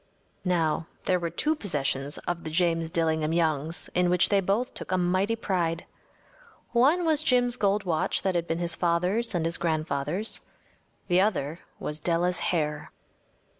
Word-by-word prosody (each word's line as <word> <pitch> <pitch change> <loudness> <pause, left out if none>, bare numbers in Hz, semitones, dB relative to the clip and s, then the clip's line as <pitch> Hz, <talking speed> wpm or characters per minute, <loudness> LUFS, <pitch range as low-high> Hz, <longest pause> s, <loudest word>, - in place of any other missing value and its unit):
Now, 165 -3 +1 0.2
there 180 -1 +2
were 170 -1 -2
two 300 - +1
possessions 145 - -2
of 175 -1 -2
the - - -4
James 165 0 +1
Dillingham 160 -1 +1
Youngs 160 -1 0
in 180 0 +2
which 180 0 +4
they 200 - +4
both 205 +7 0
took - - -7
a 185 - +2
mighty 185 +5 +1
pride. 175 -6 -1 0.9
One 285 +9 +4
was 315 -2 +3
Jim’s 245 -5 +3
gold 205 -2 +1
watch 165 -4 0
that 190 - +1
had 170 -1 -1
been 165 - -1
his 170 0 -1
father’s 180 +7 0
and 165 -2 0
his 165 +1 0
grandfather’s. 155 +4 -1 0.7
The 180 0 +4
other 170 -6 0 0.2
was 150 +1 -4
Della’s 175 +2 +1
hair. 150 -3 -1
175 Hz, 160 wpm, -27 LUFS, 160-195 Hz, 0.9 s, which